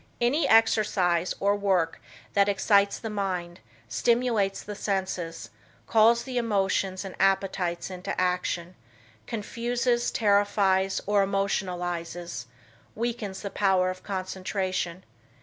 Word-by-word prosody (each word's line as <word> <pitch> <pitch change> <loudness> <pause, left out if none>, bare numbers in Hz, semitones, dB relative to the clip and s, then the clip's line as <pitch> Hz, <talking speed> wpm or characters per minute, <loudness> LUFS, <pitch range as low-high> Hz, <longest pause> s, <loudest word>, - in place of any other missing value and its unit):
Any 275 +6 +2
exercise 205 -6 +3
or 200 +1 +2
work 190 -5 0 0.3
that 200 -1 +4
excites 200 0 +3
the 225 - -6
mind, 185 -4 -3 0.3
stimulates 230 -5 +1
the 210 - -6
senses, 190 -5 -3 0.3
calls 230 +2 +4
the 255 -2 -2
emotions 195 -3 0
and 190 - -6
appetites 190 -2 0
into 180 0 -4
action, 180 -1 -1 0.5
confuses, 240 +2 -1
terrifies 200 -2 +2
or 205 0 +3
emotionalizes, 175 -6 -2 0.5
weakens 220 -4 -3
the 200 - -4
power 190 -2 +2
of 185 - -9
concentration. 185 -1 -3
195 Hz, 105 wpm, -27 LUFS, 185-210 Hz, 0.5 s, that